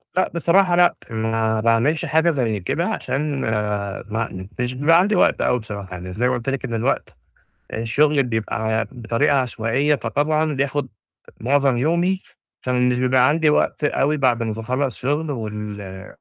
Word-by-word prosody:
لأ، 185 Hz, -, +1 dB
بصراحة 175 Hz, +2 st, +3 dB
لأ، 175 Hz, 0 st, +4 dB
ما 110 Hz, 0 st, 0 dB
باعملش 115 Hz, +8 st, +2 dB
حاجة 160 Hz, +2 st, +3 dB
زي 115 Hz, -8 st, -1 dB
كده 90 Hz, -, -1 dB
عشان، 140 Hz, 0 st, -2 dB
ما 105 Hz, -2 st, -2 dB
ما 105 Hz, -4 st, -4 dB
مش 125 Hz, +1 st, -1 dB
بيبقى 160 Hz, +6 st, +4 dB
عندي 205 Hz, +3 st, +2 dB
وقت -, -, +3 dB
أوي 125 Hz, -, +2 dB
بصراحة. 100 Hz, -3 st, -8 dB
يعني 90 Hz, 0 st, -7 dB
زَي 120 Hz, +5 st, +1 dB
ما 130 Hz, -, +1 dB
قُلت 120 Hz, +2 st, -2 dB
لِك 135 Hz, -1 st, -2 dB
إن 120 Hz, -, -5 dB
الوقت 115 Hz, +4 st, -1 dB, 0.6 s
الشُغل 140 Hz, +6 st, +2 dB
بيبقى 110 Hz, -1 st, -1 dB
بطريقة 120 Hz, +4 st, +1 dB
عشوائية، 130 Hz, +3 st, +1 dB
فطبعًا 150 Hz, +5 st, 0 dB
بياخد 140 Hz, 0 st, -1 dB, 0.5 s
مُعظم 135 Hz, +1 st, +2 dB
يومي، 170 Hz, +7 st, +1 dB, 0.4 s
فمش 125 Hz, -1 st, +1 dB
بيبقى 130 Hz, 0 st, +4 dB
عندي 155 Hz, +1 st, +3 dB
وقت 150 Hz, -, +1 dB
أوي 145 Hz, +1 st, +1 dB
بعد 125 Hz, -4 st, +2 dB
ما 110 Hz, -1 st, -1 dB
باخلص 125 Hz, +3 st, -2 dB
شُغل، 145 Hz, +4 st, -1 dB
وال 105 Hz, -5 st, -6 dB
125 Hz, 155 wpm, -21 LUFS, 110-145 Hz, 0.6 s, لأ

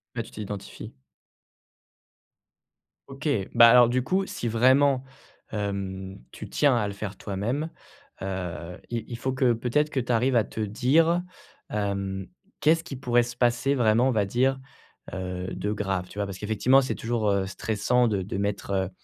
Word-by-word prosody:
Ouais, -, -, -2 dB
tu -, -, -14 dB
t'identifies. 105 Hz, -2 st, -7 dB, 2.1 s
OK, 135 Hz, +3 st, -6 dB, 0.3 s
bah, 115 Hz, 0 st, +8 dB
alors 120 Hz, 0 st, +7 dB
du 125 Hz, +1 st, +1 dB
coup, 190 Hz, +9 st, 0 dB
si 120 Hz, -, -4 dB
vraiment, 130 Hz, +4 st, +4 dB, 0.5 s
hem, 95 Hz, -2 st, -4 dB
tu -, -, -9 dB
tiens 145 Hz, -4 st, +3 dB
à 105 Hz, -3 st, 0 dB
le 100 Hz, -, -5 dB
faire 100 Hz, -1 st, -6 dB
toi-même, 115 Hz, +11 st, -3 dB, 0.5 s
heu, 90 Hz, -2 st, -5 dB
i 120 Hz, -1 st, -3 dB
il 120 Hz, -, -5 dB
faut 130 Hz, +2 st, -2 dB
que 130 Hz, -2 st, +3 dB
peut-être 125 Hz, +6 st, +1 dB
que 140 Hz, -, -1 dB
tu 125 Hz, 0 st, -2 dB
arrives 120 Hz, +2 st, +3 dB
à 115 Hz, -, +3 dB
te 110 Hz, -, -6 dB
dire, 140 Hz, -, +2 dB, 0.5 s
hem: 100 Hz, -2 st, -2 dB, 0.3 s
«Qu'est-ce 165 Hz, +2 st, +4 dB
qui 145 Hz, -, -7 dB
pourrait 120 Hz, -2 st, +2 dB
se 120 Hz, +1 st, -7 dB
passer 125 Hz, +3 st, +2 dB
vraiment 120 Hz, 0 st, +3 dB
on -, -, +2 dB
va 105 Hz, -4 st, +1 dB
dire, 130 Hz, +6 st, +1 dB, 0.6 s
heu, 90 Hz, 0 st, -4 dB
de 105 Hz, -, -2 dB
grave?» 95 Hz, -3 st, -2 dB
Tu -, -, -13 dB
vois? 100 Hz, -, 0 dB
Parce 100 Hz, -2 st, -7 dB
qu'effectivement, 110 Hz, +6 st, +3 dB
c'est 130 Hz, -, -2 dB
toujours, 115 Hz, -2 st, -1 dB
heu, 100 Hz, -1 st, +1 dB
stressant 110 Hz, +5 st, +1 dB
de 100 Hz, -4 st, 0 dB
de 95 Hz, +1 st, -4 dB
mettre, 100 Hz, 0 st, -2 dB
heu, 95 Hz, -2 st, 0 dB
115 Hz, 170 wpm, -26 LUFS, 100-130 Hz, 2.1 s, bah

